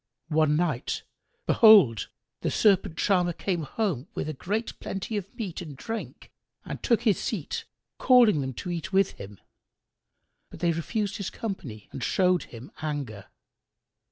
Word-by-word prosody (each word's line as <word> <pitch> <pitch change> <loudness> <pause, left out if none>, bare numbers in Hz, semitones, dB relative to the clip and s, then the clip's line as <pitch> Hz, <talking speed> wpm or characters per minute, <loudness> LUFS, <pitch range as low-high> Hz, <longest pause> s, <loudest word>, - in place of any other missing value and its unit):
One 155 -1 +3
night, 155 -6 -1 0.4
behold, 190 - +6 0.3
the - - 0
Serpent 195 -5 +3
charmer 180 -3 +2
came 175 0 -2
home 160 - -2
with 155 -1 -3
great 215 +5 -3
plenty 195 +3 -4
of 200 -1 -4
meat 205 -9 -5
and 150 -6 -8
drink 225 - -6 0.3
and - - -6
took 235 -2 +2
his 215 -5 +3
seat - - -3 0.3
calling 235 - +6
them 130 -1 -3
to 180 - -5
eat 170 0 -4
with 195 0 +3
him: 100 0 -10 1.1
but - - -11
they 170 - +2
refused 200 +5 -2
his 200 -3 -3
company 135 - -6
and 130 - -6
showed 180 -2 +2
him 120 +3 -11
anger. 140 -10 -4
175 Hz, 145 wpm, -27 LUFS, 150-205 Hz, 1.1 s, behold